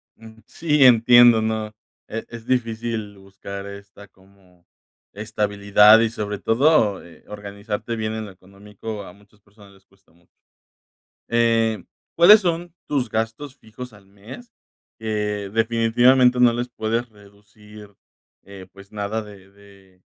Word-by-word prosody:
Mm, 110 0 -16
sí, 150 0 0
entiendo. 120 -1 +6
No 110 -1 -3 0.4
e 115 +1 -6
es 115 -1 -11
difícil 115 -4 -3
buscar 100 0 -10
esta 100 0 -13
como 95 -2 -27 0.5
estabilidad 105 0 +3
y 115 -1 +1
sobre 105 -2 -5
todo, 115 -4 +2
eh, 85 -2 -18
organizarte 105 +2 -6
bien 110 0 -3
en 110 0 -5
lo 105 - -11
económico. 100 +3 -10
A 90 - -13
muchas 100 +1 -25
personas 100 -1 -20
les 95 -1 -24
cuesta 100 0 -31
mucho. 85 0 -31 1.0
Eh, 115 -3 +1 0.3
¿cuáles 205 +6 +8
son 175 -2 -3
tus 135 -5 -2
gastos 115 +6 -4
fijos 120 +1 -12
al 100 -2 -19
mes?, 110 - -14 0.5
que 105 -2 -4
definitivamente 120 +3 +3
no 120 -1 +5
les 120 +1 -4
puedes 115 0 -3
reducir, 105 0 -17 0.5
eh, 100 -1 -12
pues, 100 +1 -17
nada 105 +1 -4
de 100 -2 -15
de 100 -2 -22
110 Hz, 135 wpm, -21 LUFS, 100-115 Hz, 1.0 s, cuáles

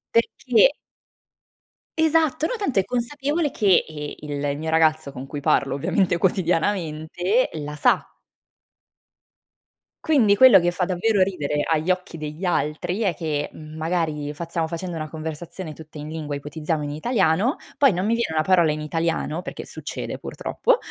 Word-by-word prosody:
Perché 230 +1 +4 1.3
Esatto, 320 -1 +2
no - - -1
tanto 340 - 0
è 190 - +2
consapevole 285 - -1
che, 195 -4 +3
ehm, 150 -2 -6
il 145 0 -2
mio 160 +1 -4
ragazzo 155 -3 +2
con 130 0 -7
cui 145 +1 -6
parlo 140 -1 +2
ovviamente 175 +4 +1
quotidianamente 180 +3 0
la 150 -1 -5
sa. - - +2 1.9
Quindi, 250 -11 +4
quello 235 -4 +8
che 175 - +1
fa 180 +1 -1
davvero 190 +2 +2
ridere 150 -6 -1
agli 160 +2 0
occhi 180 -2 -1
degli 155 +4 -5
altri 175 +3 -1
è 190 -7 +1
che, 150 -2 -2
mhmm, 155 0 -11
magari 155 -3 -2
fa 170 +3 -5
stiamo 165 -1 -1
facendo 170 +1 -5
una 155 -1 -4
conversazione 160 +2 -6
tutta 155 0 -12
in 150 +1 -7
lingua, 155 -2 -4
ipotizziamo 150 +2 -3
in 145 - -4
italiano, 200 - +1 0.2
poi 280 -2 +7
non 185 +1 -1
mi 225 - +2
viene 230 -9 -1
una 155 - +2
parola 170 -3 +4
in 155 0 -3
italiano, 165 +1 -1
perché - - -7
succede - - -6
purtroppo, - - 0
165 Hz, 155 wpm, -23 LUFS, 155-200 Hz, 1.9 s, quello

